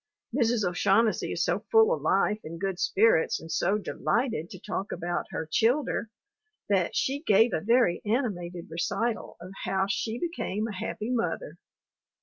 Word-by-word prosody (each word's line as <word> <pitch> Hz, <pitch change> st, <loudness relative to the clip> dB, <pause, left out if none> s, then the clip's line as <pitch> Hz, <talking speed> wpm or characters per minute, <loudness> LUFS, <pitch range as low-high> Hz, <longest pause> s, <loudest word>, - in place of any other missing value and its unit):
Mrs. 230 Hz, -6 st, +2 dB
O'Shaughnessy 200 Hz, +5 st, +2 dB
is -, -, 0 dB
so -, -, +1 dB
full 445 Hz, +1 st, +6 dB
of -, -, -3 dB
life 210 Hz, -, +2 dB
and 165 Hz, +1 st, -7 dB
good 190 Hz, -1 st, -2 dB
spirits 205 Hz, -5 st, +3 dB
and 165 Hz, 0 st, -9 dB
so 195 Hz, +4 st, +1 dB
delighted 215 Hz, -, -1 dB
to 185 Hz, -, -10 dB
talk 195 Hz, +2 st, -4 dB
about 175 Hz, 0 st, -2 dB
her 160 Hz, -, -4 dB
"childher" 230 Hz, -, +1 dB, 0.6 s
that 190 Hz, -4 st, +1 dB
she 275 Hz, +2 st, 0 dB
gave 225 Hz, -4 st, +4 dB
a 160 Hz, -, 0 dB
very 230 Hz, -4 st, +3 dB
animated 185 Hz, -7 st, -2 dB
recital 220 Hz, +7 st, -2 dB
of 180 Hz, +2 st, -10 dB
how 190 Hz, 0 st, +1 dB
she 220 Hz, +3 st, -2 dB
became 225 Hz, -, -2 dB
a 220 Hz, -, -5 dB
happy 210 Hz, +4 st, -4 dB
mother. 250 Hz, -, -2 dB
210 Hz, 155 wpm, -28 LUFS, 180-235 Hz, 0.6 s, full